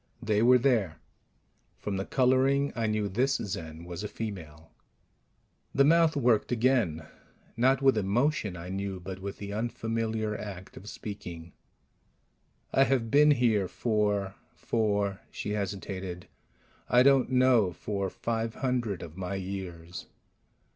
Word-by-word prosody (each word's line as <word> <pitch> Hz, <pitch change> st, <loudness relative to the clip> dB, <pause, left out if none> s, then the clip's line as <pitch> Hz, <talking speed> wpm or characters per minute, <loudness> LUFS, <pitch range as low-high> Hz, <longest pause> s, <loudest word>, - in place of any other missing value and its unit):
They 110 Hz, -3 st, +1 dB
were 125 Hz, +2 st, +7 dB
there. 115 Hz, -, +1 dB, 0.8 s
From 100 Hz, -2 st, -3 dB
the 95 Hz, -, -3 dB
coloring, 135 Hz, +2 st, +2 dB
I 115 Hz, -1 st, 0 dB
knew 105 Hz, -1 st, 0 dB
this 130 Hz, +8 st, +1 dB
Zen 80 Hz, -5 st, -5 dB
was 90 Hz, +2 st, -6 dB
a -, -, -2 dB
female. 80 Hz, -9 st, -7 dB, 1.0 s
The 140 Hz, -, +5 dB
mouth 165 Hz, +1 st, +4 dB
worked 120 Hz, -6 st, +2 dB
again 115 Hz, -10 st, +1 dB, 0.5 s
not 130 Hz, +3 st, +3 dB
with 135 Hz, -2 st, +5 dB
emotion, 105 Hz, -, 0 dB
I 85 Hz, +1 st, -8 dB
knew, 95 Hz, 0 st, -3 dB
but 95 Hz, +1 st, -7 dB
with 100 Hz, +1 st, -6 dB
the 100 Hz, 0 st, -6 dB
unfamiliar 110 Hz, -1 st, -2 dB
act 95 Hz, -3 st, -8 dB
of 105 Hz, -, -9 dB
speaking. 85 Hz, -6 st, -8 dB, 1.2 s
"I 135 Hz, -, +5 dB
have 120 Hz, -3 st, 0 dB
been 150 Hz, +1 st, +6 dB
here 115 Hz, -8 st, +3 dB
for 105 Hz, -3 st, 0 dB, 0.2 s
for 100 Hz, -3 st, 0 dB
" -, -, -35 dB
she 105 Hz, -, -5 dB
hesitated 95 Hz, -3 st, -4 dB, 0.6 s
"I 125 Hz, +2 st, +6 dB
don't 135 Hz, -2 st, +4 dB
know. 125 Hz, -7 st, +4 dB
For 100 Hz, +1 st, -3 dB
five 115 Hz, +2 st, -3 dB
hundred 120 Hz, -8 st, -1 dB
of 85 Hz, +1 st, -10 dB
my 95 Hz, +1 st, -3 dB
years." 90 Hz, -3 st, -6 dB
105 Hz, 135 wpm, -29 LUFS, 95-125 Hz, 1.2 s, were